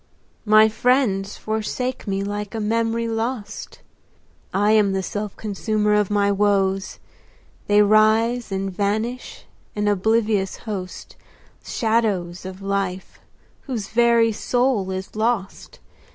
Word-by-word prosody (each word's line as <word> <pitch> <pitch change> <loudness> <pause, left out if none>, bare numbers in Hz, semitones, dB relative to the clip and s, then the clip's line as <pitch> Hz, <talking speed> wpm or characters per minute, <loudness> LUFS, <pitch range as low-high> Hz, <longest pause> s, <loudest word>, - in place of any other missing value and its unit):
My 215 0 +6
friends 220 -4 +1
forsake 220 +4 -3
me 195 0 -1
like 205 +1 -4
a - - -2
memory 230 +2 0
lost. 225 0 -4 0.7
I 205 +2 +2
am 210 -3 +4
the 190 0 -1
self 205 +2 -4
consumer 210 0 -1
of 210 -2 +2
my 200 -1 +2
woes; 195 -1 +1 0.7
They 210 0 +5
rise 220 +2 +3
and 195 0 -2
vanish, 220 +5 -2 0.3
an 210 0 -1
oblivious 210 0 +1
host, 190 -4 -6 0.5
Shadows 205 -7 -1
of 190 +1 -8
life, 195 -2 -3 0.5
whose 225 -7 -4
very 235 -1 +4
soul 245 -3 0
is 190 +1 -5
lost. 215 -3 -2
210 Hz, 115 wpm, -22 LUFS, 195-225 Hz, 0.7 s, My